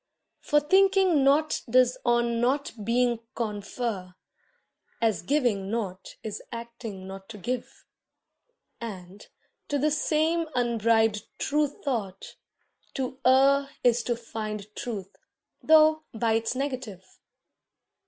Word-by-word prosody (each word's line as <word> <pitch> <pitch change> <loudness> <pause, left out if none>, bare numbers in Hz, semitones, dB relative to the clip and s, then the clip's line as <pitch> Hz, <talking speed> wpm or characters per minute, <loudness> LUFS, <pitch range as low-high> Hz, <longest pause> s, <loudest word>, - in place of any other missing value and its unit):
For 295 - +2
thinking 375 -1 +4
nought 295 +3 +3
does 255 +1 +4
on 240 -1 +2
nought 275 +4 +1
being 240 +1 +1 0.2
confer, 205 -3 -4 0.8
As 220 -7 +1
giving 210 - 0
not 195 -4 -4
is 215 -2 -5
acting 230 -4 -7
not 195 +1 -9
to 220 - -8
give, 245 +5 -5 0.9
And, 195 -3 -8 0.4
to 290 - 0
the 300 +2 +1
same 315 +2 +1
unbribed 225 -3 +2
true 295 +1 +1
thought, 225 -9 -5 0.6
to 260 0 -3
err 275 +2 +5
Is 245 -1 +4
to 240 - 0
find 215 -3 -6
truth, 205 -5 -5 0.5
though 315 0 +5
by 225 0 +1
its 225 +2 0
negative. 255 -9 -4
235 Hz, 110 wpm, -27 LUFS, 210-275 Hz, 0.9 s, err